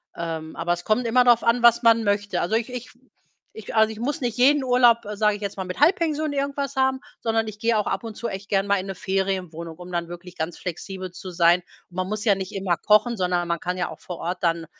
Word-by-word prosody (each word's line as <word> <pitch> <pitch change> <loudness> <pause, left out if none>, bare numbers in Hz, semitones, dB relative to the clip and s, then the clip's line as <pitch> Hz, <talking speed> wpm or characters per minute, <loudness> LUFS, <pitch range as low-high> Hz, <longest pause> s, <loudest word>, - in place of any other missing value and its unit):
Ähm, 160 -1 -5
aber 175 - 0
es 175 0 -6
kommt 235 +3 +1
immer 250 +2 +4
drauf 240 -1 +5
an, 235 +1 +2
was 235 0 +5
man 230 -1 +5
möchte. 205 0 0
Also, 195 +6 0
ich 230 +2 -1
ich 250 -1 -6 0.6
ich 220 0 -8
also, 220 0 +4
ich 220 - -9
muss 275 +4 -2
nicht 240 -2 -2
jeden 275 +2 +4
Urlaub, 245 -2 +5 0.2
sage 210 0 +2
ich 205 - -10
jetzt 200 -1 -4
mal, 190 - -3
mit 180 +5 -6
Halbpension 310 -2 +2
irgendwas 280 0 -2
haben, 265 0 +2 0.2
sondern 225 -1 0
ich 210 0 -11
gehe 230 -1 +2
auch 210 - 0
ab - - -2
und 220 -2 -7
zu 235 - -4
echt 195 +1 -7
gern 195 0 +1
mal 200 0 +3
in 190 - -6
'ne 195 - -5
Ferienwohnung, 185 -4 -3
um 180 0 -10
dann 170 -1 -2
wirklich 175 +1 -10
ganz 160 +2 -3
flexibel 185 +1 -6
zu 185 +1 -9
sein. 175 +1 +4 0.3
Man 185 +1 -3
muss 215 +2 -4
ja 205 -3 +5
nicht 190 -1 -6
immer 190 -3 0
kochen, 215 +3 +3
sondern 180 -1 0
man 170 -1 -1
kann 180 +1 -3
ja 180 - -1
auch 160 - -10
vor 180 -2 -7
Ort 180 +2 -3
dann, 165 -1 +1
205 Hz, 250 wpm, -24 LUFS, 180-235 Hz, 0.6 s, drauf